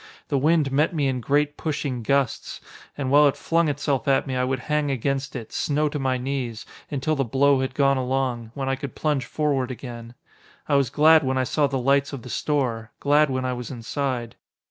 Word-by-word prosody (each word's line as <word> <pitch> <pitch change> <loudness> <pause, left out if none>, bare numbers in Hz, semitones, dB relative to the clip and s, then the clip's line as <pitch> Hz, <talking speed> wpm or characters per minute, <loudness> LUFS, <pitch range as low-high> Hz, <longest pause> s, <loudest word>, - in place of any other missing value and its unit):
The 140 - +1
wind 150 -1 +2
met 150 +5 +1
me 145 -3 +1
in 130 -2 -1
great 145 +3 +1
pushing 145 -5 -3
gusts, 140 +3 -1 0.4
and 135 -2 -2
while 145 +1 +7
it 140 - 0
flung 165 0 +1
itself 140 -1 -1
at 135 -1 +3
me 130 - -3
I 125 - +1
would 130 0 -1
hang 150 +1 0
against 135 +1 -2
it, 115 -4 -6
snow 150 +1 0
to 145 - -4
my 130 -1 0
knees, 125 -4 -4 0.2
until 145 +2 -1
the 135 - +1
blow 135 +3 +3
had 130 0 -2
gone 140 -1 +3
along, 130 -3 -1
when 135 -1 -3
I 135 - +1
could 135 0 -7
plunge 145 -5 0
forward 140 -4 0
again. 120 -2 -8 0.5
I 150 - 0
was 140 -3 +3
glad 155 +3 +5
when 130 0 0
I 130 - +2
saw 145 +3 +1
the 135 -1 -2
lights 140 +2 +2
of 130 -4 -6
the 125 - -9
store, 120 -7 -1
glad 145 +1 +3
when 130 -1 -2
I 130 - -1
was 125 -1 -6
inside. 125 -1 -3
135 Hz, 210 wpm, -24 LUFS, 130-145 Hz, 0.5 s, while